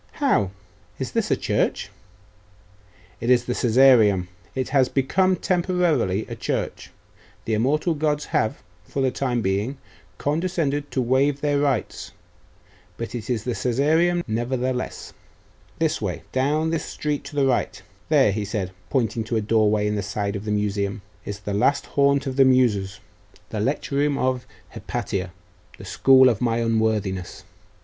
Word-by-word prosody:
'How? 270 - +1 0.5
Is - - -4
this - - -1
a - - +3
church?' - - -1 1.3
'It 115 - -3
is 120 -1 +4
the 125 - -1
Caesareum. 115 -7 +4 0.3
It 130 -1 -2
has 130 -2 +3
become 185 +8 +2
temporarily 175 - +1
a - - -6
church. - - -3 0.6
The 110 - -1
immortal 145 +10 +1
gods 150 -1 -1
have, 110 - 0 0.2
for 135 - -3
the 130 - +2
time 125 -4 -1
being, 100 +8 -1 0.4
condescended 150 - -1
to 130 - -1
waive 135 +3 +2
their 145 -1 +1
rights; 130 -10 -1 0.8
but 115 -1 -5
it 115 -2 -6
is 115 -4 -1
the 125 - -2
Caesareum, 155 +10 +1
nevertheless. 125 +3 -3 0.6
This - - 0
way; - - -3
down 150 +5 +1
this 165 - -2
street 150 -1 -3
to 150 - -9
the 140 -1 +3
right. 130 -2 0 0.3
There,' 100 - +4
said 100 -2 -3
he, - - -21 0.2
pointing 115 -4 0
to 115 - -2
a 110 - +1
doorway 105 -1 +2
in 105 - 0
the 105 - -1
side 100 +1 -3
of 100 +1 -5
the 105 - -2
Museum, 105 0 -1 0.2
'is 100 0 -6
the 100 0 -4
last 140 +8 +2
haunt 140 0 +2
of 130 -1 -4
the 135 - +6
Muses 110 -7 +2 0.5
the 110 - -3
lecture 140 +4 -1
room 145 0 +2
of 130 -1 -1 0.2
Hypatia, 95 -2 -4 0.5
the - - -11
school 130 -1 +5
of 115 -3 +1
my 115 -2 +1
unworthiness. 110 -5 -1
125 Hz, 155 wpm, -23 LUFS, 105-140 Hz, 1.3 s, the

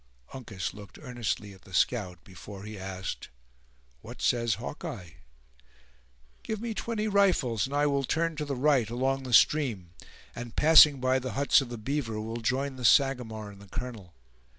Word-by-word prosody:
Uncas 110 -8 -5
looked 100 -2 -12
earnestly 120 -7 -4
at 95 - -17
the 95 -1 -10
scout, 90 -5 0
before 95 +1 -11
he 105 +1 -8
asked: 95 -1 -6 0.7
"What - - -11
says 115 -4 +1
Hawkeye?" 115 - -7 1.3
"Give 220 -1 -4
me 230 0 -4
twenty 220 +1 -3
rifles, 185 - +2
and 140 - -5
I 145 +1 +2
will 140 -1 +1
turn 165 +4 -1
to 150 - -3
the 140 -1 -3
right, 130 -4 +2
along 135 +3 -1
the 130 -1 -7
stream; 115 - +3 0.4
and, 120 -1 -8
passing 150 -3 +7
by 130 0 +2
the 130 -1 -5
huts 140 +1 +4
of 130 - -6
the 120 - -6
beaver, 115 -1 -3
will 110 +2 -5
join 130 +4 -2
the 125 - -8
Sagamore 120 -5 +2
and 100 0 -15
the 100 - -14
colonel. 110 -7 -7
125 Hz, 170 wpm, -28 LUFS, 105-140 Hz, 1.3 s, passing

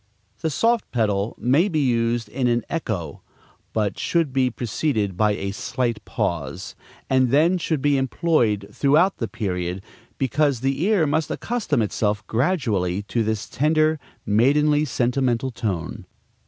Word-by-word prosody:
The 160 - -1
soft 230 - +1
pedal 105 -2 0
may 145 +11 +3
be 160 - -1
used 115 -3 +1
in 125 +4 -1
an 120 -1 +1
echo; 95 - -3 0.5
but 105 -3 -1
should 165 -6 0
be 130 -1 +2
preceded 110 - -1
by 105 +3 +2
a 100 -1 -3
slight 120 +2 -2
pause, 85 +2 -3 0.3
and 130 -1 +3
then 165 +7 +3
should 155 -4 -1
be 145 -1 +3
employed 130 - +1
throughout 155 - +3
the 115 - -2
period, 95 -5 -3 0.3
because 135 -1 +1
the 135 +2 0
ear 200 -6 +3
must 150 +1 0
accustom 210 - -1
itself 105 -1 -1
gradually 110 - 0
to 115 +3 -1
this 110 0 -2
tender, 155 +2 +2 0.3
maidenly, 145 +8 +3
sentimental 125 -1 0
tone. 95 -8 -4
125 Hz, 140 wpm, -23 LUFS, 105-150 Hz, 0.5 s, may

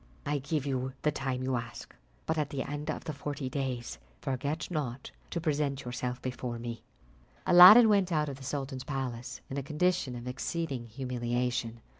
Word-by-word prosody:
"I 145 0 0
give 140 +1 -2
you 130 -1 -2
the 150 - +3
time 130 -3 -2
you 130 -1 0
ask, 115 0 -7 0.3
but 160 - 0
at 150 -2 -1
the 135 -2 -2
end 145 +2 -5
of 155 - -3
the 155 - -4
forty 140 -1 -4
days, 130 -4 -3 0.2
forget 140 +5 -3
not 135 -6 -3 0.2
to 170 - -2
present 145 -4 -1
yourself 125 0 -3
before 125 -1 -3
me." 115 0 -6 0.6
Aladdin 190 +7 +10
went 200 -4 +3
out 150 -2 +2
of 140 -2 -5
the 135 - -11
sultan's 135 -1 -4
palace 125 -3 -4
in 135 - -5
a - - -2
condition 150 -2 0
of 120 +1 -7
exceeding 130 -1 -3
humiliation. 120 -1 -2
135 Hz, 175 wpm, -30 LUFS, 125-150 Hz, 0.6 s, Aladdin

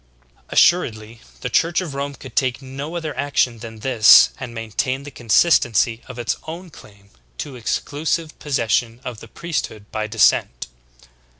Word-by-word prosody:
26. - - -7
Assuredly 115 -10 +2 0.2
the - - -3
Church 165 +1 +2
of 175 -6 -5
Rome 140 +1 -4
could - - -12
take 130 -2 +1
no 140 +4 -7
other 160 -3 -4
action 130 -4 0
than 110 -1 -10
this 115 -3 +7
and 125 -3 -6
maintain 115 +4 -3
the 145 - -9
consistency 120 - +2
of 125 - -9
its 120 -1 -2
own 170 +2 -8
claim 100 -7 -17 0.3
to 135 - -6
exclusive 145 - -2
possession 115 -4 0
of 120 -4 -6
the - - -12
priesthood 150 -11 -4
by 110 0 -2
descent. 105 - +2
125 Hz, 155 wpm, -21 LUFS, 115-145 Hz, 0.3 s, this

